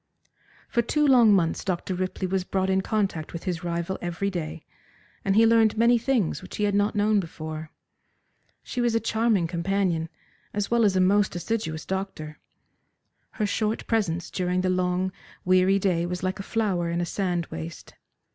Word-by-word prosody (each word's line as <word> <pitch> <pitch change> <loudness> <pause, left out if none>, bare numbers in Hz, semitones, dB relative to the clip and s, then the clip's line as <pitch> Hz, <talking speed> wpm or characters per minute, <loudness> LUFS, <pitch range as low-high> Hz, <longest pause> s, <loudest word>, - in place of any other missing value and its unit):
For 235 - +1
two 300 +6 +1
long 245 -6 +6
months 175 -5 +2
Dr. 185 0 -2
Ripley 185 +1 -2
was 185 0 0
brought 190 0 -1
in 190 0 +2
contact 195 -7 -2
with 170 - -6
his 180 -3 -3
rival 170 +2 -2
every 175 +3 -2
day, 165 -3 -5 0.6
and 195 0 +1
he 225 +1 +6
learned 225 -1 +4
many 235 +1 +4
things 235 - 0
which 185 - -9
he 210 - -1
had 205 -1 +2
not 205 +2 +1
known 210 0 +3
before. 155 -3 -6 0.9
She 250 - -3
was 240 -1 +1
a - - +4
charming 220 -4 +1
companion, 170 -1 -1 0.5
as 205 +1 -2
well 235 -1 +4
as 195 -2 +2
a - - +3
most 195 +1 +3
assiduous 175 -5 -3
doctor. 190 -6 -5 0.9
Her 215 - -1
short 215 +2 -1
presence 175 -7 -1
during 180 0 0
the 185 0 +1
long, 185 +1 0 0.3
weary 185 +1 +4
day 180 -3 +1
was 180 +1 -4
like 190 +2 -2
a 195 - -7
flower 195 -7 0
in 170 0 -1
a 175 - 0
sand 175 -2 -1
waste. 80 +1 -7
190 Hz, 175 wpm, -26 LUFS, 175-210 Hz, 0.9 s, long